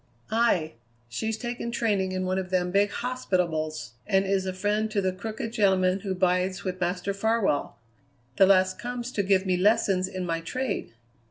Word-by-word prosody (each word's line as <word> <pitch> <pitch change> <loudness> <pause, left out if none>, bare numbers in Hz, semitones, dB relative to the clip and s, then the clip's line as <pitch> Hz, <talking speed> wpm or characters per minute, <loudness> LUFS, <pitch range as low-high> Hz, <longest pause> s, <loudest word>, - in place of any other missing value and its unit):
"Aye. 220 -9 +2 0.4
She's 220 - -2
taken 240 0 -4
training 205 -6 0
in 185 0 -2
one 185 +1 0
of 185 -1 -5
them 180 -1 0
big 200 +2 +3
hospitables, 175 - -2 0.2
and 195 0 +3
is 190 -1 0
a - - 0
friend 205 +3 0
to 215 -1 0
the 190 -1 0
crooked 220 +3 -5
gentleman 190 -4 +3
who 195 -2 -3
bides 185 +1 +1
with 185 -1 -4
Master 180 +2 -1
Farwell. 210 -6 0 0.6
The 195 - +7
lass 185 -1 +4
comes 245 0 -5
to 210 - 0
give 195 -1 +2
me 185 -1 +1
lessons 190 -1 +3
in 185 -1 -4
my 165 -1 -1
trade." 255 - -3
190 Hz, 175 wpm, -27 LUFS, 185-215 Hz, 0.6 s, The